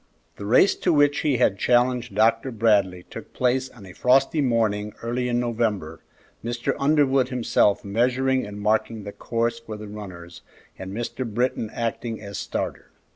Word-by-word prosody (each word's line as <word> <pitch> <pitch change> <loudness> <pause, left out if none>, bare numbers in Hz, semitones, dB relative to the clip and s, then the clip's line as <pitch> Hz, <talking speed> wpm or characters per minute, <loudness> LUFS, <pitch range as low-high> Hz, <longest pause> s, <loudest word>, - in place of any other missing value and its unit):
The 100 - -6
race 130 - +5
to 180 - +1
which 145 -2 +3
he 145 -4 +1
had 100 -5 +2
challenged 125 -2 +2
Dr. 115 +4 +3
Bradley 105 -6 +2
took - - -9
place 130 +1 0
on 110 -6 -14
a 90 - -11
frosty 135 - +3
morning 110 -5 0
early 125 +1 -1
in 120 0 +1
November, 110 -9 -2 0.4
Mr. 120 +1 -2
Underwood 140 -3 +3
himself 115 -5 +1
measuring 130 +5 +1
and 105 0 -7
marking 110 +1 0
the 100 - -6
course 115 +2 -2
for 110 -2 -8
the 105 0 -8
runners 90 -5 -9 0.3
and 95 0 -8
Mr. 120 +4 -4
Britton 115 -1 -1
acting 115 0 -3
as 100 -2 -7
starter. - - -4
115 Hz, 160 wpm, -24 LUFS, 105-125 Hz, 0.4 s, race